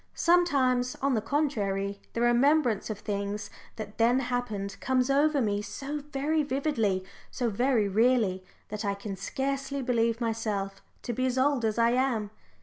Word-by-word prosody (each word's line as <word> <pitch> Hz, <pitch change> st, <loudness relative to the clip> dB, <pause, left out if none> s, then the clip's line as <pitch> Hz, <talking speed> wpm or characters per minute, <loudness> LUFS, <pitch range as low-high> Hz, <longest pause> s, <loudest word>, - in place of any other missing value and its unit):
Sometimes, 270 Hz, -8 st, +3 dB
on 275 Hz, 0 st, 0 dB
the 220 Hz, -, +1 dB
contrary, 205 Hz, -7 st, -1 dB
the 230 Hz, -, -2 dB
remembrance 240 Hz, -2 st, +3 dB
of 215 Hz, -, -3 dB
things 205 Hz, 0 st, -4 dB, 0.2 s
that 215 Hz, -1 st, -8 dB
then 235 Hz, +2 st, +4 dB
happened 245 Hz, -6 st, -2 dB
comes 260 Hz, 0 st, +1 dB
over 290 Hz, +1 st, +3 dB
me 205 Hz, -1 st, 0 dB
so 275 Hz, +8 st, -5 dB
very 300 Hz, +3 st, 0 dB
vividly, 260 Hz, -9 st, 0 dB, 0.3 s
so 240 Hz, -3 st, -2 dB
very 240 Hz, -1 st, +2 dB
real 235 Hz, +5 st, +4 dB
ly, 190 Hz, -3 st, -2 dB, 0.3 s
that 210 Hz, +1 st, -4 dB
I 200 Hz, -1 st, 0 dB
can 200 Hz, 0 st, -6 dB
scarcely 275 Hz, +6 st, -3 dB
believe 230 Hz, -2 st, +1 dB
myself 215 Hz, -4 st, -2 dB, 0.2 s
to 240 Hz, -, -3 dB
be 255 Hz, +3 st, 0 dB
as 255 Hz, 0 st, -1 dB
old 270 Hz, -1 st, +2 dB
as 220 Hz, 0 st, 0 dB
I 230 Hz, 0 st, +4 dB
am. 240 Hz, -5 st, 0 dB
240 Hz, 160 wpm, -28 LUFS, 210-270 Hz, 0.3 s, then